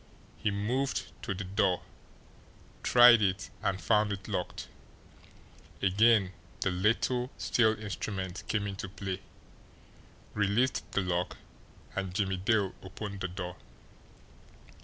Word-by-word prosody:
He - - -1
moved 115 +7 -1
to 100 - -3
the 95 - -4
door, 95 -1 +1 1.0
tried 120 -2 +8
it, 100 0 0
and 95 -1 0
found 105 0 +2
it 95 -2 -5
locked. - - -3 1.1
Again 100 0 +4 0.3
the 95 - +1
little 115 +6 +1
steel 110 +6 +2
instrument 95 -3 -4
came 105 -2 0
into 95 -1 -5
play, 95 -1 -5 1.1
released 105 +5 +1
the 100 - +2
lock, 90 -1 -1 0.6
and 95 -2 -3
Jimmie 95 -2 0
Dale 100 0 +1
opened 100 +1 -7
the 95 - -2
door. 90 -1 -6
100 Hz, 115 wpm, -30 LUFS, 95-110 Hz, 1.1 s, tried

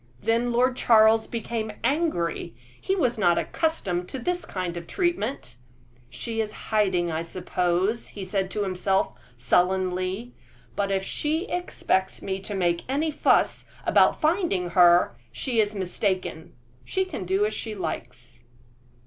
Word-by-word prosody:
Then 230 - +1
Lord 250 +2 +2
Charles 220 -1 +5
became 225 -2 -3
angry; 235 - 0 0.3
he 385 - 0
was 245 - +1
not 175 -4 +4
accustomed 185 - -1
to - - -5
this 355 +8 -2
kind 180 -2 -4
of 170 -1 -7
treatment. 345 - -2 0.5
"She 225 - -3
is 215 -1 -3 0.2
hiding, 185 -5 +2
I 160 0 -1
suppose," 180 +4 -1
he 200 -2 -7
said 190 0 -1
to 205 +1 -2
himself, 190 0 0 0.2
sullenly; 185 - 0 0.4
"but 200 -1 0
if 195 0 0
she 310 - -1
expects 270 - -1
me 190 0 -2
to 200 +1 -6
make 175 -2 +1
any 300 +4 0
fuss - - +2 0.2
about - - +4
finding 310 - +1
her, 175 -1 +5 0.2
she 235 - -1
is 210 0 -1
mistaken. 185 -3 -2 0.3
She 380 0 -1
can 370 - -5
do 190 +3 +1
as 215 - -2
she 215 0 -4
likes." 195 - -6
200 Hz, 140 wpm, -25 LUFS, 180-240 Hz, 0.5 s, Charles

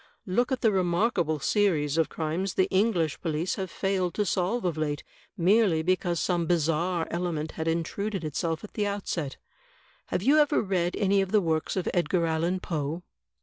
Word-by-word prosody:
Look 240 +7 +1
at 260 - -1
the 220 - +4
remarkable 175 -3 +1
series 155 -7 +1
of 165 -1 +2
crimes 170 +4 -2
the 185 - +4
English 185 -6 +1
police 165 +1 -1
have 190 -2 -3
failed 185 -2 -1
to 210 - +1
solve 190 +5 0
of 175 -3 0
late, 150 -2 -2 0.3
merely 185 -2 +3
because 175 -1 +1
some 175 -2 0
bizarre 170 +1 +1
element 170 -3 -2
had 160 0 -4
intruded 175 +4 -2
itself 160 +1 -2
at 210 - -10
the 205 -1 0
outset. 180 -8 -3 0.7
Have 185 - -2
you 290 +6 +5
ever 295 0 +3
read 180 -4 0
any 200 -1 +2
of 190 -1 -3
the 215 - +5
works 160 -4 -1
of 185 -2 -2
Edgar 175 -1 +1
Allan 165 +3 0
Poe?" 160 +1 -3
175 Hz, 175 wpm, -27 LUFS, 160-195 Hz, 0.7 s, you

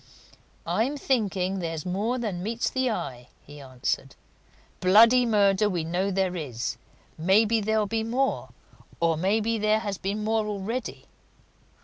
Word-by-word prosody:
"I'm 265 +6 0
thinking 195 -8 0
there's 165 -3 -4
more 205 +7 -1
than 210 -8 -3
meets 225 +4 -2
the 260 -1 0
eye," 125 - -4 0.2
he 145 0 -12
answered. 130 -2 -3 0.6
"Bloody 230 +6 +6
murder 205 -1 +3
we 175 -4 -2
know 180 +4 -1
there 190 -1 0
is 130 -9 -4 0.4
maybe 215 +6 +3
there'll 215 +1 +1
be 225 +2 -1
more, 255 +4 -1 0.5
or 165 -1 +2
maybe 215 +6 0
there 215 +1 +2
has 200 -3 -4
been 205 +2 -3
more 220 0 0
already. 210 +4 -4
205 Hz, 135 wpm, -26 LUFS, 180-225 Hz, 0.6 s, Bloody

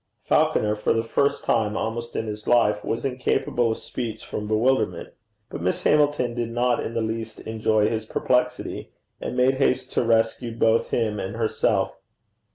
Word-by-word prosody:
Falconer, 105 0 +2
for 105 - +1
the 115 - 0
first 140 +5 0
time 110 -2 +1
almost 115 +1 -4
in 110 - -1
his 105 0 -6
life, 105 -4 +3
was 115 +3 -2
incapable 125 -2 0
of 110 - -1
speech 115 -3 -5
from 105 - -5
bewilderment. 120 +5 +1 0.4
But - - -5
Miss 90 +2 -1
Hamilton 145 -5 +2
did 120 -1 -2
not 120 +1 +1
in 115 - -5
the 115 - 0
least 110 0 -4
enjoy 110 -1 +1
his 110 -1 -2
perplexity, 125 +1 -1 0.3
and - - -4
made 130 +1 +3
haste 135 -2 +1
to - - +2
rescue 115 +1 +1
both 115 0 +2
him 110 -3 0
and 95 - -4
herself. 115 -1 0
115 Hz, 165 wpm, -24 LUFS, 110-125 Hz, 0.4 s, life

